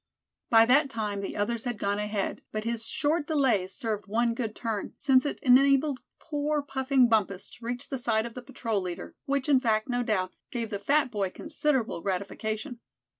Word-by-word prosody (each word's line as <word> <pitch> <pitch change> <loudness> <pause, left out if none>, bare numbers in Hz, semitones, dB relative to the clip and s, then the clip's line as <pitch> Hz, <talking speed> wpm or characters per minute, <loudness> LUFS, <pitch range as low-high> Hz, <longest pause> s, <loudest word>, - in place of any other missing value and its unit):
By 225 -1 +7
that 275 +4 +4
time 210 -4 -3
the 195 - -5
others 225 +3 -1
had 240 -3 -2
gone 200 0 -1
ahead, 210 -1 -2
but 215 0 -3
his 230 0 -2
short 295 +1 0
delay 260 - +2
served 210 +1 -4
one 230 +3 +1
good 230 -2 -3
turn, 225 -4 -4
since 270 0 +3
it - - -3
enabled 275 +1 +5 0.2
poor 295 -1 -1
puffing 265 -2 +2
Bumpus 200 -4 0
to 240 - -15
reach 245 +1 -3
the 270 - -3
side 220 -2 +1
of 235 - -7
the 250 - -7
patrol 230 -5 -2
leader, 180 -2 -6
which 280 -1 0
fact, 220 -3 +1
no 245 -1 0
doubt, 200 -6 0 0.2
gave 230 -2 -4
the 200 - -2
fat 275 +4 +2
boy 200 -4 -1
considerable 260 - -1
gratification. 215 - -3
235 Hz, 180 wpm, -28 LUFS, 210-265 Hz, 0.2 s, By